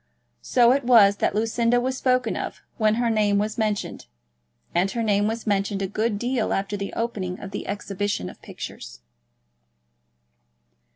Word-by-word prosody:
So 240 -1 +4
it 275 +2 +2
was 215 -5 +6
that - - 0
Lucinda 230 +2 +2
was 260 +1 -1
spoken 255 -3 +1
of - - -5
when 215 -1 +3
her 235 0 +1
name 210 -2 +2
was 215 +2 -1
mentioned; 210 - -2 0.7
and 180 +3 +2
her 230 +3 -2
name 205 -1 +2
was 225 +1 -3
mentioned 200 -1 0
a - - -1
good 215 +2 -1
deal 240 +1 -1
after 195 +1 -2
the 200 0 -4
opening 195 -6 -3
of 195 - -8
the 205 - -5
exhibition 200 - -3
of - - -11
pictures. - - -9
215 Hz, 160 wpm, -24 LUFS, 200-235 Hz, 0.7 s, was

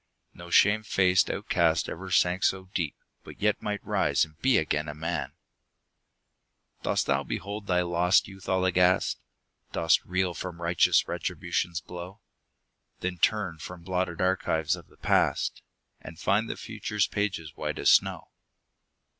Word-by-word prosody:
No 85 -1 -11
shame 105 +4 +5
faced 95 -3 +3
outcast 80 -1 +1
ever 95 +2 -6
sank 90 +1 +2
so 95 0 +1
deep, 80 -6 -2 0.3
But - - -12
yet 105 0 +1
might 105 -1 -4
rise - - +2
and 80 -1 -20
be 130 -1 +4
again 75 -1 0
a 75 - -6
man! 80 +2 -3 1.5
Dost - - 0
thou - - +1
behold 100 +1 -5
thy 90 -1 +2
lost 90 +2 +3
youth 95 -1 -11
all 95 0 +2
aghast? 90 0 +2 0.5
Dost 80 -2 +3
reel 95 0 -1
from 85 +1 -6
righteous 85 0 +3
Retribution's 85 -1 -2
blow? 90 +3 -9 0.8
Then 90 -1 -3
turn 95 -5 +1
from 90 +2 -9
blotted 90 -1 -2
archives 90 -4 +1
of - - -13
the - - -23
past, - - +1 0.4
And 80 - -11
find 110 +3 +1
the - - -4
future's 105 -1 -2
pages 95 -7 -3
white - - -4
as - - +4
snow. - - +2
90 Hz, 145 wpm, -27 LUFS, 85-95 Hz, 1.5 s, shame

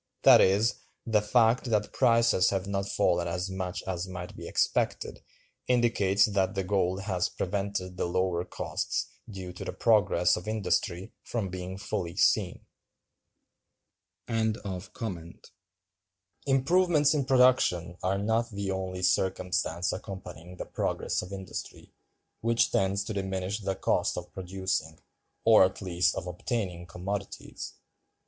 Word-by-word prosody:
That - - +9
is, 105 +6 +3 0.3
the 110 -3 +3
fact 115 +3 +3
that 105 -3 0
prices 115 -6 +4
have 95 -1 -1
not 100 0 -2
fallen 90 -3 +1
as 90 +2 -3
much 95 0 -4
as 95 -1 -3
might 90 -1 -7
be - - -8
expected, - - 0 0.5
indicates 115 -5 +3
that 100 -1 0
the 95 - 0
gold 95 0 0
has 95 -3 -1
prevented 95 -1 -3
the - - 0
lower 90 0 0
costs 90 - -3 0.2
due 95 -3 -7
to 90 - -7
the - - -5
progress - - +3
of - - -7
industry 100 -3 -1
from 110 -5 -3
being 90 +1 -6
fully 95 -3 -4
seen. 95 -2 +2 1.6
Improvements 105 -4 -4 1.6
in 145 -3 0
production 125 - +3
are 95 +2 0
not 110 +3 0
the 100 -3 -3
only 95 -1 -4
circumstance 90 -1 0
accompanying 90 -2 -8
the - - -5
progress - - -2
of 90 - -9
industry, 95 -1 -7 0.5
which 115 0 +2
tends 95 +1 +1
to 110 - -5
diminish 95 +1 -2
the 95 -2 -2
cost - - 0
of - - -7
producing, 95 -4 -3 0.5
or 110 -3 +8
at 95 - 0
least 90 -2 +1
of - - -4
obtaining, 90 -1 -3
commodities. 100 +2 -6
95 Hz, 130 wpm, -29 LUFS, 90-105 Hz, 1.6 s, That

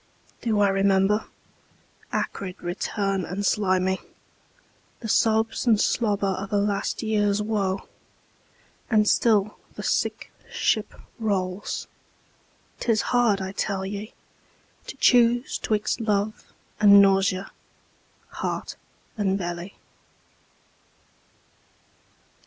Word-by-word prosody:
Do 220 -3 0
I 200 - +4
remember? 195 +2 +2 0.8
Acrid 185 -2 -3
return 195 +2 -2
and 195 +4 -4
slimy, 190 -2 +1 1.0
The 225 - -5
sobs 220 +2 +1
and 220 -3 +5
slobber 205 -4 +1
of 195 0 -6
a 205 - +2
last 200 +2 -1
years 210 -2 +1
woe. 200 -3 -1 1.0
And 215 -2 +3
still 215 -3 +2 0.2
the - - -7
sick - - -1 0.2
ship 215 -2 0 0.2
rolls. 195 -3 -2 0.9
'Tis 225 -3 +1
hard, 230 -5 +3
I 190 0 -4
tell 195 -1 -2
ye, 205 +3 -6 0.7
To - - -8
choose 240 0 +3
'twixt 215 +1 -1
love 210 -1 -1 0.3
and 200 -1 +8
nausea, 195 -1 +3 0.8
heart - - -4 0.4
and 195 -2 +1
belly. 175 +1 -5
205 Hz, 95 wpm, -25 LUFS, 195-215 Hz, 1.0 s, and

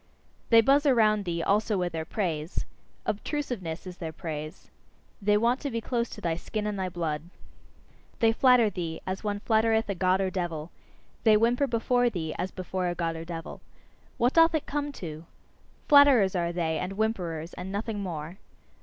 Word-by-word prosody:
They 230 -1 +8
buzz 280 +5 +4
around 215 -5 +4
thee 170 -1 -2
also 210 +1 +1
with 180 -1 -1
their 160 -1 -3
praise: 165 -3 -2 0.4
obtrusiveness, 210 - -3
is 180 -1 -8
their 165 -3 -5
praise. 155 -1 -7 0.5
They 205 +1 +3
want 235 +4 +2
to 285 - -3
be 230 -3 -2
close 235 +1 -2
to - - -9
thy 165 -1 -1
skin 210 +4 -4
and 210 -2 -2
thy 185 -1 -1
blood. 160 -4 -2 1.0
They 225 -1 +4
flatter 240 -2 +4
thee, 165 -3 -4
as 190 +2 -4
one 205 -1 -2
flattereth 220 0 +2
a - - +1
God 185 +1 +2
or 190 -1 0
devil; 170 -4 -4 0.5
they 220 -2 +6
whimper 240 +5 +2
before 245 +1 +2
thee, 160 -7 -4
as 185 - -1
before 185 0 -3
a 175 - -2
God 165 -1 -2
or 165 0 -6
devil. 165 -1 -7 0.6
What 245 +2 +2
doth 330 0 +5
it 310 - -1
come 290 0 -2
to! 160 - -7 0.6
Flatterers 275 - +6
are 170 -1 0
they, 165 -2 -1
and 180 +2 -3
whimperers, 180 -6 -2
and 180 +2 -6
nothing 210 +1 -3
more. 175 -1 -5
195 Hz, 180 wpm, -28 LUFS, 170-230 Hz, 1.0 s, They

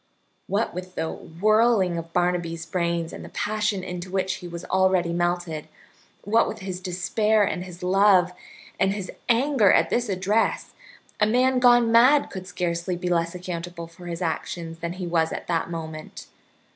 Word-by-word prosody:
What 205 +3 0
with 180 +1 -7
the 160 - -2
whirling 210 +1 +2
of 165 0 -9
Barnaby's 175 -2 -1
brains 170 -1 -1
and - - -8
the - - -9
passion 210 -2 -1
into 180 0 -6
which 190 0 -1
he 180 - -9
was 170 0 -7
already 185 -2 +2
melted, 175 -2 -1 0.6
what 225 +3 +3
with - - -5
his 190 -2 -5
despair 205 +4 +1
and 180 -2 -1
his 180 -1 -11
love, 185 -1 +4 0.5
and 195 0 +2
his 200 -3 -5 0.2
anger 240 -3 +4
at - - +3
this 240 -2 0
address, 200 +4 0 0.5
a 210 - +4
man 255 +3 +3
gone 240 -2 +5
mad 255 +5 +5
could 185 -1 -7
scarcely 175 0 -2
be 180 0 -3
less 170 0 0
accountable 175 -1 -6
for 170 +2 -13
his 170 +1 -4
actions 165 0 -4
than 170 +1 -4
was 165 -1 +1
he - - -4
at - - -6
that 165 -1 -1
moment. 160 -2 -7
180 Hz, 170 wpm, -24 LUFS, 170-205 Hz, 0.6 s, gone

